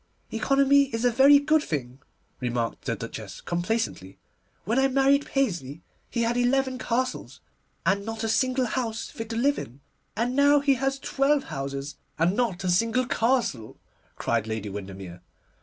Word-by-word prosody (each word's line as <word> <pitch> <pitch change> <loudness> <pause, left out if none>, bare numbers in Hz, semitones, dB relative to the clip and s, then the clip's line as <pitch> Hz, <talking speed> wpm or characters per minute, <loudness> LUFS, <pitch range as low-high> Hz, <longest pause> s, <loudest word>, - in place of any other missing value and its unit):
'Economy 275 +4 +4
is 240 -3 -3
a 245 - +4
very 270 +4 +7
good 305 +2 +3
thing,' 130 - -4 0.4
remarked 120 -2 -3
the - - -1
Duchess - - -7
complacently; 175 - -3 0.5
'when 230 +7 +1
I 270 - +4
married 275 +1 +3
Paisley 170 - -2 0.3
he 235 - -1
had 230 +1 0
eleven 255 +1 +1
castles, 255 +1 -2 0.5
and 200 +1 +2
not 225 +1 -5
a - - 0
single 255 +3 +1
house 230 -2 -3
fit 225 -1 -7
to 225 - -4
live 280 +5 +2
in.' 125 +4 -9 0.4
'And 240 +4 -1
now 285 +1 +5
he 280 0 +3
has 270 +1 -1
twelve 275 +1 +1
houses, 140 0 -5 0.2
and 170 +4 +2
not 215 -7 -1
a 185 - 0
single 230 +7 +2
castle,' 230 - 0 0.4
cried 115 -2 -1
Lady 110 -2 -4
Windermere. 95 -3 -8
230 Hz, 155 wpm, -26 LUFS, -, 0.5 s, very